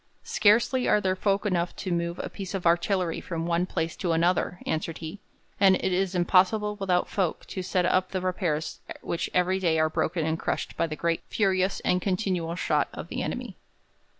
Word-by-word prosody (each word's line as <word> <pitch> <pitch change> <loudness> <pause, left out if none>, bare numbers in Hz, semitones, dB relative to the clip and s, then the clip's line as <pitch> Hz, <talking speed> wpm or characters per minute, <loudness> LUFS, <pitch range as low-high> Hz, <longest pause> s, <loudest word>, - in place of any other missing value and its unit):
'Scarcely 235 +4 +3
are - - +4
there 185 -2 0
folk 195 +2 0
enough 180 -3 0
to 185 - -4
move 170 0 -1
a - - -3
piece 195 -1 -6
of 185 - -4
artillery 175 +1 +1
from 165 -2 -4
one 170 +1 +1
place 165 -3 -2
to 175 -3 -1
another,' 175 +2 +1
answered 160 +1 -2
he, 165 +5 -7 0.4
'and 190 -1 +6
it 185 - -1
is 190 0 0
impossible 195 +4 +3
without 185 -3 +1
folk 185 -5 -1
to 190 - -5
set 180 0 0
up 185 +1 +2
the 190 - -2
repairs 180 -4 -2 0.2
which 170 - -2
every 180 +1 +2
day 165 -4 +2
are 155 0 +2
broken 160 0 0
and 160 +1 -1
crushed - - -3
by 165 - 0
the 155 - -4
great, 170 +1 0
furious, 190 -2 +1
and 180 0 +1
continual 185 -4 -1
shot - - +1
of - - -8
the - - -3
enemy.' - - -4
180 Hz, 195 wpm, -27 LUFS, 170-190 Hz, 0.4 s, and